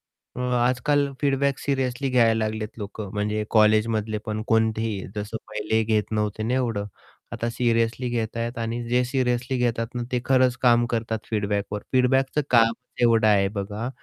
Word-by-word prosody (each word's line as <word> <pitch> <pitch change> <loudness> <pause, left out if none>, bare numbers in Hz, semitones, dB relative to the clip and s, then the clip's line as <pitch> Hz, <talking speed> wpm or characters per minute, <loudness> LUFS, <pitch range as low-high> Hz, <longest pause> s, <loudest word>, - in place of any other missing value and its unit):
पण 125 - -12
अं, 125 0 -1
आजकाल 140 +4 +1
feedback 140 -1 +1
seriously 135 -1 -1
घ्यायला 115 -3 +4
लागलेत 110 0 -3
लोकं. 105 -1 -6
म्हणजे 105 +1 -1
कॉलेजमधले 110 0 +3
पण 110 0 -3
कोणतेही, 110 -2 0
जसं 105 +2 -4
पहिलेही 110 +1 0
घेत 110 -1 0
नव्हते 105 0 -1
ना 120 +3 0
एवढं, 115 -6 -1 0.5
आता 115 - -2
सिरियसली 115 +1 0
घेत 115 -1 -2
आहेत 115 +1 -3
आणि 115 +1 -3
जे 125 +1 +3
सिरियसली 125 0 -1
घेतात 115 -1 -1
ना, 120 - -2
ते 125 - +1
खरंच 130 -2 +3
काम 120 -1 +5
करतात 115 -1 -1
फीडबॅकवर. 105 -1 -1
फीडबॅकचं 130 +3 +2
कामच 115 +1 +2
एवढं 115 -2 +4
आहे 100 -2 +4
बघा 105 +4 -4
115 Hz, 160 wpm, -24 LUFS, 110-125 Hz, 0.5 s, काम